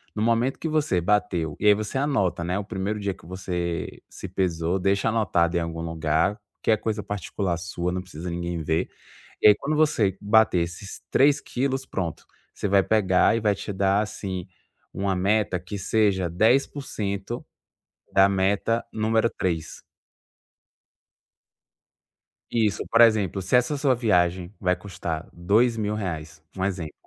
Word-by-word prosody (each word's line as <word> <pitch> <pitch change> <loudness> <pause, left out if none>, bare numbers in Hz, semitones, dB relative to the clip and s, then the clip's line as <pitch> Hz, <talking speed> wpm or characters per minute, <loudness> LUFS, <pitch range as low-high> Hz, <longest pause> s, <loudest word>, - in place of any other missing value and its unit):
No 105 - -2
momento 115 +3 +1
que 165 - -3
você 150 - +1
bateu 90 -5 0
e - - -3
aí 105 - +8
você 110 +5 -3
anota, 100 - 0
né, 90 +2 -1
o - - -3
1º 100 +1 -3
dia 100 -1 -2
que 90 - -19
você 85 -3 -4
se - - -8
pesou. 90 -1 -1
Deixa 100 +3 +1
anotado 90 -6 +1
em - - +2
algum 85 0 -4
lugar, 80 +5 0 0.2
que - - +2
é 110 - +4
coisa 105 -1 -3
particular 95 -2 -3
sua, 85 +1 -3
não 90 - -2
precisa 90 -1 -8
de 85 - -3
ninguém 85 -1 -3
ver. 80 +1 0 0.5
E - - +7
aí, 105 - +8
quando 150 +8 -2
você 110 - +2
bater 110 -2 +4
esses 85 +4 -5
3 145 +1 +4
quilos, 135 +1 -2
pronto. 85 -5 -4 0.3
Você 105 - -2
vai 100 0 +4
pegar 100 0 +3
e - - -1
vai 105 -2 +2
te 100 - -6
dar, 95 +1 +2
assim, 95 -4 -5 0.5
uma 95 0 -1
meta 100 0 +1
que 90 +3 -7
seja 95 -2 +1
10% 110 - 0 0.7
da 95 0 +6
meta 100 +4 +1
número 110 +1 +2
3. 85 -4 -3 2.7
Isso. 110 -4 +1
Por 115 - +5
exemplo, 105 -5 +4
se 95 +6 +1
essa 125 +4 +2
sua 140 -2 +2
viagem 90 -5 +1
vai 90 -2 +1
custar 85 -5 -5
2000 105 +4 +1
reais 80 -6 -5
um 95 - -2
exemplo. 90 -6 -3
100 Hz, 155 wpm, -25 LUFS, 90-110 Hz, 2.7 s, aí